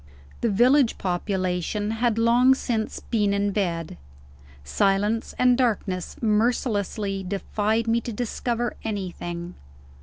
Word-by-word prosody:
The 235 - +2
village 245 +5 +4
population 185 +2 -1
had 225 0 0
long 240 +3 +5
since 225 -4 -3
been 205 -3 0
in 200 0 0
bed. 170 - -2 0.6
Silence 200 - 0
and 250 0 +4
darkness 210 -7 -1
mercilessly 210 -3 0
defied 205 +3 -1
me 230 +1 +2
to 235 - -5
discover 240 +1 -2
anything. 180 -4 -5
210 Hz, 110 wpm, -24 LUFS, 195-235 Hz, 0.6 s, long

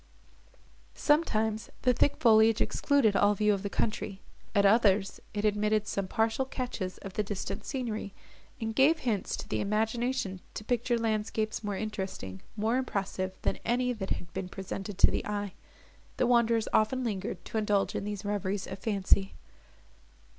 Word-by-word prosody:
Sometimes, 220 -8 +1
the 250 - +4
thick 285 - +2
foliage 225 -1 +5
excluded 265 -8 +2
all 205 +1 +4
view 210 +1 +3
of 195 - -2
the 200 - -3
country; 200 -2 -2 0.4
at 200 0 +5
others, 200 -2 +4 0.2
it 205 +1 -1
admitted 210 0 +2
some 200 -2 -2
partial 225 +6 +1
catches 250 -8 -4
of 195 - -7
the 210 - 0
distant 205 -1 -4
scenery, 230 -6 -3 0.5
which 225 0 -2
gave 280 +7 +5
hints 220 -6 -1
to - - -7
the - - -1
imagination 220 0 0 0.2
to 215 - -5
picture 240 +1 +1
landscapes 215 -1 -1
more 205 -2 -2
interesting, 190 - -5 0.2
more 220 +4 +1
impressive, 190 -6 -2
than - - 0
any 250 +1 +1
that 195 -4 -5
had 170 - -4
been 190 -1 -4
presented 195 +1 -6
to - - +6
the - - -1
eye. 205 -2 -3 0.6
The - - +3
wanderers 235 -2 +3
often 255 +4 +2
lingered 195 -5 -3
to 220 - -2
indulge 205 -2 +1
in - - -2
these 205 0 -5
reveries 200 -1 -1
of 190 - -7
fancy. 195 -2 +1
215 Hz, 160 wpm, -30 LUFS, 195-230 Hz, 0.6 s, to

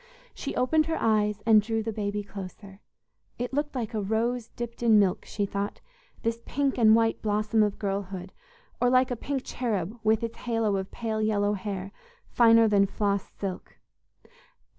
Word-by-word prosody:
She - - -5
opened 310 +5 +2
her 325 - -1
eyes 210 -2 +1
and 220 -2 +6
drew 225 +1 -2
the 225 0 -3
baby 205 0 -2
closer. 195 0 -10 0.6
It 245 +2 -4
looked 295 +1 -1
like 230 -4 -3
a 215 - -1
rose 225 +3 -1
dipped 235 0 -7
in 225 -2 +5
milk, 195 -3 +2
she 205 - -2
thought, 200 +1 -4 0.4
this 230 0 -1
pink 275 -1 -1
and 220 -1 +7
white 225 0 +1
blossom 215 +1 +1
of 210 -1 +1
girlhood, 195 -2 -4 0.5
or 245 - +4
like 255 0 +3
a - - 0
pink 270 +2 -3
cherub, 220 -3 -3
with 220 +1 +2
its 230 0 -4
halo 225 -4 0
of 190 0 -4
pale 220 -2 -3
yellow 205 -1 +1
hair, 195 -1 -4 0.3
finer 230 -1 +5
than 200 -2 +4
floss 200 -1 -1
silk. 190 -2 -6
215 Hz, 170 wpm, -27 LUFS, 200-235 Hz, 0.6 s, and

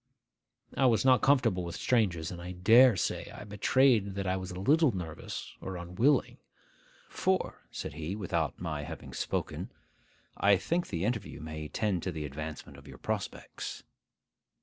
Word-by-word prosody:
I 135 - +4
was 115 -1 +3
not 130 -1 +6
comfortable 130 -10 +3
with 85 0 -5
strangers, 95 -10 +1
and 85 -1 -7
I 90 +1 -6
dare 115 +7 +6
say - - -2
I - - -9
betrayed 105 0 +3
that 100 0 -2
I 95 0 +1
was 95 -1 -5
a 90 - -6
little 150 - +4
nervous 85 -6 -6
or 95 -1 -5
unwilling. 90 +12 +1 0.7
'For,' - - 0
said - - -6
he, 80 +5 -4
without 100 -5 -2
my 80 -4 -3
having 80 +2 -8
spoken, - - -3 0.7
'I 100 -1 +5
think 170 - -1
the 85 +3 -2
interview 110 -2 -2
may 80 0 -6
tend 100 0 -1
to 95 - -2
the 80 -2 -4
advancement 75 +2 -7
of - - -16
your - - -10
prospects. - - -5
95 Hz, 160 wpm, -30 LUFS, 85-115 Hz, 0.7 s, not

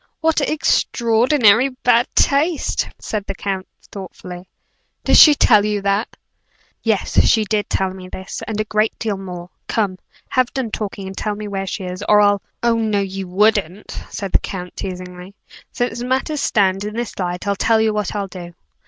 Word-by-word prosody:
"What 320 0 +2
extraordinary 245 -5 +3
bad 245 -2 +2
taste!" 300 +3 +2
said 215 -2 -4
the 195 - -4
count, 190 -1 -3 0.2
thoughtfully. 180 -1 -9 0.6
"Did - - +4
she 300 -2 +9
tell 215 -7 +5
you 210 0 0
that?" 200 +3 -1 0.6
"Yes; 220 -4 +2
she 220 -1 +3
did 210 0 -1
tell 190 -1 0
me 185 -1 -10
this, 190 +1 -7
and 215 -1 -3
a - - +2
great 215 +1 0
deal 215 -3 -2
more. 180 -2 -8 0.2
Come 200 -5 -1 0.3
have 255 -1 +1
done 255 -5 -2
talking, 200 -2 -4
and 190 0 -7
tell 210 +1 -2
me 210 0 -6
where 195 -1 -3
she 195 - -4
is, 185 +2 -5
or 210 - +6
I'll 205 -1 +4
" - - -46
"Oh, 235 -1 +3
no, 215 -2 +1
you 195 -1 -4
wouldn't!" 205 0 +1 0.2
said 195 -2 -5
the - - +4
count, 180 -2 -7
teasingly. 180 +1 -7 0.4
"Since 245 -1 -2
matters 265 +4 -1
stand 195 -3 +2
in 210 +1 -5
this 240 -3 -4
light 180 0 -3
I'll 200 0 +1
tell 225 +2 +2
you 220 -1 +2
what 210 -2 -2
I'll 200 -1 -2
do. 175 -2 -10
205 Hz, 180 wpm, -19 LUFS, 190-230 Hz, 0.6 s, she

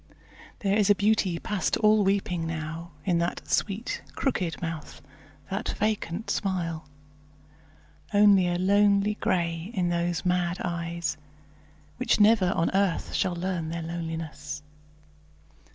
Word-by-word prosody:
There 200 -1 +2
is 210 -1 +3
a 205 - +7
beauty 200 -4 +2
past 210 +2 -1
all 215 -1 +4
weeping 190 -4 0
now 165 +1 -5 0.2
In 175 -3 +2
that 170 +1 -2
sweet, 210 +3 -1
crooked 185 -11 -1
mouth, 165 -3 -5 0.5
that 195 +5 -2
vacant 215 -2 -1
smile; 165 -5 -2 1.2
Only 205 -3 +6
a 175 0 0
lonely 200 +2 +3
grey 170 -3 -1
in 180 -2 +1
those 175 0 -1
mad 180 +1 +1
eyes, 170 -1 -3 0.8
Which 255 -2 +1
never 205 -3 +5
on 165 - +1
earth 195 -3 +1
shall 180 - 0
learn 175 -2 -2
their 165 0 -4
loneliness. 160 -2 -5
180 Hz, 120 wpm, -27 LUFS, 170-200 Hz, 1.2 s, a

